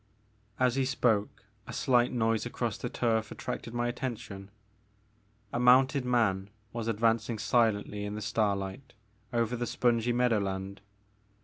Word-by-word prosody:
As 130 0 +2
he 135 - +2
spoke 110 -7 0 0.2
a - - -7
slight 125 -2 +3
noise 115 -2 +1
across - - -2
the - - -4
turf 110 -2 0
at - - -8
tracted - - -5
my 120 0 -1
attention. 110 -6 -5 1.0
A - - 0
mounted 130 +2 +5
man 105 -6 +1 0.2
was 115 -1 -3
advancing 115 0 +1
silently 105 -3 +1
in 105 0 -4
the 105 - -5
starlight 105 +2 -1 0.4
over 115 0 0
the 120 0 -3
spongy 120 -1 +1
meadowland. 100 -5 0
115 Hz, 135 wpm, -30 LUFS, 105-125 Hz, 1.0 s, mounted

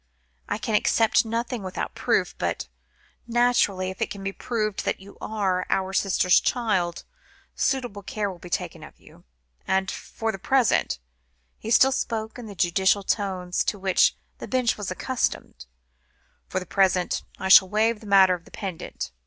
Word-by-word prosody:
I 205 - -1
can 220 0 -4
accept 225 +2 +3
nothing 230 +1 -3
without 185 -1 -4
proof, - - 0
but, - - -2 0.6
naturally, 235 -6 +2
if 190 - -12
it - - 0
can 200 -1 -7
be 195 - -2
proved 215 -3 -2
that - - -1
you 200 +1 -14
are 195 -4 -1
our 190 0 0
sister's 185 -2 +3
child, 190 -8 -1 0.5
suitable 245 -7 -1
care 205 0 -3
will 180 - -12
be 175 - -11
taken - - -3
of - - -14
you. - - -19 0.4
And 190 0 +1
for 225 0 -4
the 195 - -8
present," 240 - +2 0.6
he 220 - -6
still 265 +3 +6
spoke 225 -2 -3
in 235 - -8
the 205 - -9
judicial 190 +3 +2
tones, 185 -3 -1
to 205 - -1
which 190 -1 +3 0.2
the - - -7
Bench 255 -3 +1
was 205 -2 -5
accustomed, 230 - -3 0.8
"for 185 - -2
the 180 - -8
present 185 -1 +1
I 190 - -3
shall 190 0 +8
waive 220 +2 +1
the 215 - -12
matter 190 -2 +6
of 170 -2 -6
the - - -16
pendant. 190 - -6
200 Hz, 170 wpm, -25 LUFS, 185-225 Hz, 0.8 s, shall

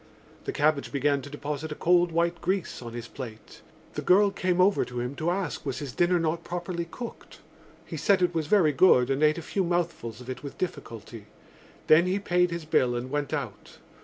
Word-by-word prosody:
The - - -2
cabbage 150 -1 +1
began 140 0 +1
to 145 - -9
deposit 150 +1 -5
a - - -3
cold 175 +1 +3
white 170 +1 0
grease 185 -5 -2
on 115 -1 -8
his 120 0 -6
plate. 115 -5 -10 0.3
The - - -3
girl 200 +2 +5
came 185 -2 0
over 195 +2 +4
to 125 -1 -6
him 125 +2 -3
to 160 +2 0
ask 180 -2 -2
was 135 -3 -3
his 145 -4 -5
dinner 175 +1 +3
not 165 +1 -1
properly 175 0 -4
cooked. 235 +6 -9 0.4
He - - -6
said 195 -3 +3
it 175 0 +2
was 160 -3 -1
very 175 -5 +4
good 135 -5 +5
and 135 +2 0
ate 155 +1 +4
a 170 - -5
few 195 +4 -1
mouthfuls 170 -10 -2
of 125 - -11
it 130 - -5
with 140 - -8
difficulty. 115 - -6 0.6
Then 165 +3 +6
he 185 +2 +1
paid 180 -3 +2
his 170 -2 -5
bill 125 -5 +2
and 125 +2 -4
went 145 -2 -2
out. - - -5
160 Hz, 210 wpm, -27 LUFS, 135-180 Hz, 0.6 s, Then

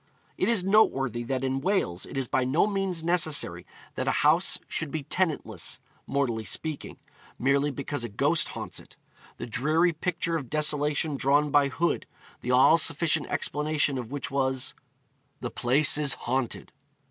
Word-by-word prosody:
It - - 0
is 225 -6 +3
noteworthy 135 - +2
that 130 +1 -2
in 135 0 -1
Wales 155 - -1
it - - -7
is 135 -2 -1
by 130 - +1
no 135 +9 +2
means 195 -5 -1
necessary 155 - +1 0.3
that - - -4
a - - +1
house - - +4
should 160 - -3
be 155 0 -4
tenantless, 140 - -1 0.3
mortally 120 -6 -1
speaking, 155 +6 -3 0.4
merely 140 +3 +2
because 140 -1 -4
a 120 - -4
ghost 145 +10 +1
haunts - - -5
it. - - -16 0.4
The - - -5
dreary 155 +9 +1
picture 170 0 -2
of 135 -6 -7
desolation 150 0 0
drawn 145 +2 +2
by 145 -1 +4
Hood, 170 +5 -1 0.3
the 125 - -6
all 130 +6 +5
sufficient 160 -1 +1
explanation 150 -2 0
of 120 -3 -7
which 140 -2 -4
was... 130 -2 0 0.7
the - - -5
place 135 +4 +4
is 145 -2 +2
haunted! 130 0 -3
145 Hz, 160 wpm, -27 LUFS, 130-160 Hz, 0.7 s, all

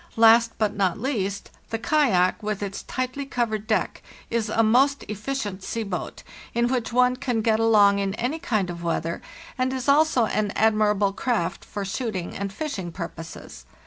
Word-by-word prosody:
Last, 230 +1 +6
but 215 -2 +1
not 190 -3 +1
least, 205 -6 -2 0.2
the 225 - -1
kayak, 225 -9 +2
with 210 -1 -3
its 200 0 -4
tightly 255 +2 -3
covered 230 -5 -2
deck, 220 - 0 0.3
is 230 -2 0
a 225 +1 +2
most 265 +6 +3
efficient 210 -2 -4
sea 230 +3 -3
boat, 195 -4 -5 0.3
in 235 0 +2
which 245 -3 -1
one 250 +1 +3
can 250 -4 -1
get 220 -1 +2
along 205 -3 +5
in 195 0 -1
any 250 +8 -2
kind 205 - -1
of 170 0 -8
weather, 170 0 -2 0.4
and 255 0 +1
is 260 0 -4
also 285 -4 +4
an 210 -1 -1
admirable 210 -2 +3
craft 195 -6 -1
for 205 -1 -5
shooting 195 -4 -3
and 200 0 -3
fishing 195 - -4
purposes. 165 -2 -8
220 Hz, 170 wpm, -24 LUFS, 200-250 Hz, 0.4 s, Last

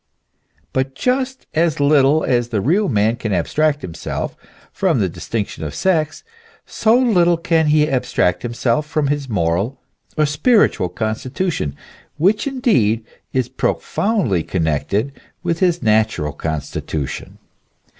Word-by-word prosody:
But 130 0 -1
just 260 - -1
as 160 -2 +1
little 145 +1 +4
as 120 -2 +1
the 110 -3 0
real 180 - +2
man 110 +1 +2
can 115 -3 -3
abstract 145 - +1
himself 85 - -4 0.4
from - - +1
the - - +2
distinction 105 -7 -4
of 75 -2 -5
sex, 160 -5 0 0.4
so 225 +2 +2
little 180 -9 +3
can 165 -1 +1
he 150 0 +4
abstract 125 - 0
himself 120 +4 -1
from 150 -2 0
his 145 -2 -2
moral 100 +6 0 0.4
or 155 - +4
spiritual 145 - +2
constitution, 110 - -2 0.4
which 195 - +2
indeed 125 - +1 0.3
is 130 -2 0
profoundly 130 - 0
connected 80 - -1 0.3
with 170 -2 -1
his 175 -2 +1
natural 110 -9 +1
constitution. 75 -2 -4
135 Hz, 125 wpm, -19 LUFS, 105-170 Hz, 0.4 s, little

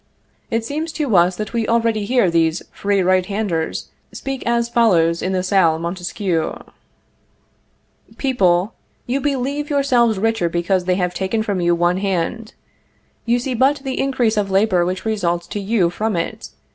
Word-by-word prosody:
It 225 0 -1
seems 310 +5 -3
to 290 -9 0
us 175 +1 +4
that 215 +4 -5
we 230 -2 0
already 230 -2 +1
hear 240 -6 +2
these 165 0 +1
free 200 -1 0
right 185 0 +3
handers 190 -5 -3 0.2
speak 270 -1 -5
as 235 0 +1
follows 175 -9 +3
in 185 - -1
the 185 -1 0
Salle 185 -4 +3
Montesquieu: 175 0 -2 1.6
"People, 195 -7 +1 0.3
you 265 +3 -1
believe 285 +1 -2
yourselves 250 -6 +2
richer 225 -3 0
because 175 +2 0
they 180 0 +2
have 180 -1 -1
taken 190 +4 -1
from 200 -4 -2
you 175 0 +3
one 175 +1 +1
hand; 195 +4 -2 0.7
you 235 +1 +3
see 250 +1 -3
but 270 +4 +2
the 265 -2 -3
increase 250 -5 +1
of 200 -1 0
labor 190 -2 +3
which 185 +3 -4
results 175 -6 -1
to 205 - -5
you 195 -4 +1
from 215 +3 -2
it. 170 - -4
205 Hz, 160 wpm, -19 LUFS, 180-235 Hz, 1.6 s, us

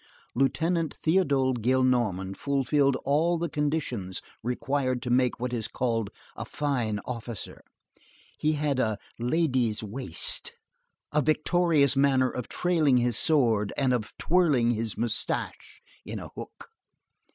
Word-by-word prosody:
Lieutenant 160 +5 0
Théodule 140 -7 +2
Gillenormand 120 -6 +1
fulfilled 140 +1 +1
all 160 +5 +2
the 170 +1 -2
conditions 140 -11 -2 0.2
required 130 +2 -1
to 125 - -3
make 125 -1 +2
what 125 0 -3
is 115 -3 -2
called 115 -4 -1 0.3
a - - -5
fine 120 -8 -2
officer. 115 -4 -6 0.8
He 155 +1 +2
had 145 -3 -1
"a 110 -4 0 0.2
lady's 125 -5 +1
waist," 105 -4 -2 0.6
a 150 - +2
victorious 155 -1 +2
manner 135 -2 +3
of 125 - -5
trailing 160 -7 +2
his 120 -1 +2
sword 115 -7 +3
and 130 -2 +2
of 110 -3 -2
twirling 150 -9 +3
his 115 -1 -3
moustache 115 -2 -2 0.2
in - - -6
a - - -7
hook. - - -10
130 Hz, 125 wpm, -27 LUFS, 120-150 Hz, 0.8 s, manner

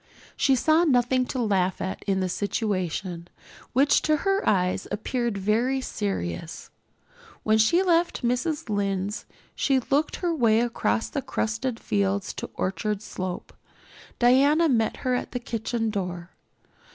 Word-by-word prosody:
She 270 - +3
saw 315 +6 +3
nothing 255 -3 +2
to 260 - -3
laugh 190 -5 +1
at 190 - -4
in 190 -1 +1
the 185 - 0
situation, 185 -3 -2 0.4
which 275 +3 +4
to 310 0 +2
her 390 +1 +2
eyes 185 -2 +1
appeared 235 +1 -2
very 225 +7 +1
serious. 95 - -4 0.7
When 220 0 +3
she 340 +12 +4
left 345 -4 +1
Mrs. 255 +6 -1
Lynde's 200 -1 -2 0.3
she 270 -2 +2
took 285 +4 0
her 350 -2 -1
way 230 -6 +3
across 235 -1 0
the 280 - -3
crusted 230 +1 -2
fields 200 -1 -1
to - - -6
Orchard 210 +2 -2
Slope. 185 -3 -5 0.6
Diana 280 +7 +4
met 225 -6 +1
her 255 - +2
at 250 - -3
the 245 - -1
kitchen 230 -1 -2
door. 180 -3 -4
225 Hz, 140 wpm, -25 LUFS, 195-265 Hz, 0.7 s, which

